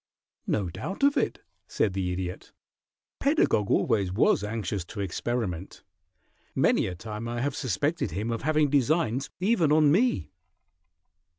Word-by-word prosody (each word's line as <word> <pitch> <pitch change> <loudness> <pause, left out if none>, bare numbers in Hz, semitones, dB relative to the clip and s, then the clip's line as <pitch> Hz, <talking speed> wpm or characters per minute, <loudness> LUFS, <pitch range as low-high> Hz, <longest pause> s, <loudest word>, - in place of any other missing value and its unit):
"No 100 -4 0
doubt 160 - -5
of 280 0 +5
it," 260 - -1 0.2
said 100 - 0
the 95 -2 -1
Idiot. 90 0 -5 0.7
"Pedagog 275 - +2
always 100 -4 +2
was 100 +1 +3
anxious 105 -3 -3
to 105 - -9
experiment. 100 -2 -3 0.7
Many - - +3
a 90 - -5
time 110 +4 -6
I 120 0 -3
have 140 +1 -1
suspected 140 - -1
him 105 +8 -3
of 115 - -2
having 150 0 +2
designs 140 -2 +1
even 185 -5 +2
on 150 -1 +5
me." 235 - +2
115 Hz, 135 wpm, -27 LUFS, 100-155 Hz, 0.7 s, of